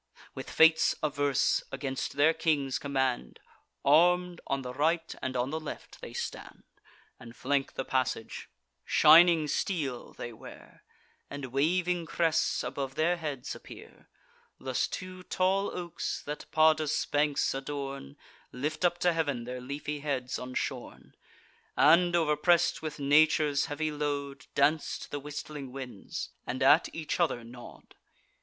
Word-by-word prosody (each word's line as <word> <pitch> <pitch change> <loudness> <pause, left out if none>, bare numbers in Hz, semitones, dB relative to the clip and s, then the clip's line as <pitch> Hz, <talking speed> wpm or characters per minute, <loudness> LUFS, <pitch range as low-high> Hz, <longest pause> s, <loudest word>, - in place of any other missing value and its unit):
With - - -7
fates 160 0 +5
averse, 145 -2 +1
against 135 -1 -4
their 145 +3 +4
king's 145 -6 0
command, 130 -3 -2 0.5
Arm'd, 175 +4 +4
on 135 -1 -1
the 125 0 -6
right 165 +4 0
and 130 -1 -3
on 125 +2 -1
the 160 - -2
left 155 - -9
they - - -8
stand, - - -6 0.6
And 120 -1 -12
flank 140 0 -1
the 135 - -3
passage: 130 -4 -2 0.3
shining 165 0 +6
steel 140 -6 -2
they 120 - -7
wear, 110 - -14 0.5
And 140 -1 -6
waving 175 +4 +1
crests 165 -1 +1
above 135 +1 -4
their 170 +3 +2
heads 145 -6 -5
appear. - - -13 0.5
Thus 130 -1 -1
two 185 0 -7
tall 190 +2 0
oaks, 175 -2 -4
that 150 +1 -6
Padus' 155 -1 +3
banks 145 -1 +1
adorn, 135 - -6 0.3
Lift 150 +6 -3
up 175 -1 +3
to 175 -1 +3
heav'n 145 -7 -1
their 125 +1 -6
leafy 145 +3 -5
heads 135 -4 -3
unshorn, 125 0 -5 0.6
And, 175 +3 +5
overpress'd 165 +1 +2
with 155 -1 -5
nature's 150 0 +3
heavy 155 +1 -2
load, 145 -2 -4
Dance 145 +2 +2
to - - -11
the 145 - -3
whistling 145 -1 -7
winds, 130 -6 -7 0.2
and 130 +2 -2
at 145 +5 +5
each 160 +1 -4
other 155 -9 +1
nod. 120 +1 -13
145 Hz, 135 wpm, -29 LUFS, 135-160 Hz, 0.6 s, shining